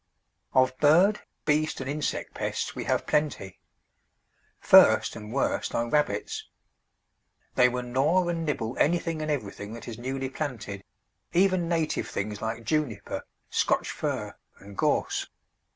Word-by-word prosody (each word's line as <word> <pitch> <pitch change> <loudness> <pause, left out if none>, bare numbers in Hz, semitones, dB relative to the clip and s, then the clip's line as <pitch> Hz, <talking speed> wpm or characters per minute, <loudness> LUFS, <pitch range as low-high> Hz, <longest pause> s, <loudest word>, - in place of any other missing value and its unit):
Of 130 0 +4
bird, 180 +8 +5 0.2
beast, 155 +1 +1
and 135 - -5
insect 145 +1 -2
pests - - -3
we - - -5
have - - 0
plenty. 145 -11 -1 1.0
First, - - +6
and 105 -1 -8
worst, 135 +3 -1
are 120 0 -1
rabbits. 145 -9 0 1.1
They 125 0 +5
will 125 0 -3
gnaw 140 +9 +2
and 170 -1 -1
nibble 125 -6 -2
anything 165 0 +1
and 155 - -3
everything 105 -6 -4
that 115 - -9
is 115 -1 -7
newly 130 +1 -3
planted, 115 -10 -5 0.5
even 185 -1 +3
native 165 -2 0
things 105 +1 -4
like 115 +1 -3
Juniper, 145 -7 -2 0.2
Scotch - - +1
Fir, - - -3 0.2
and 100 0 -13
Gorse. - - 0
135 Hz, 135 wpm, -27 LUFS, 115-155 Hz, 1.1 s, First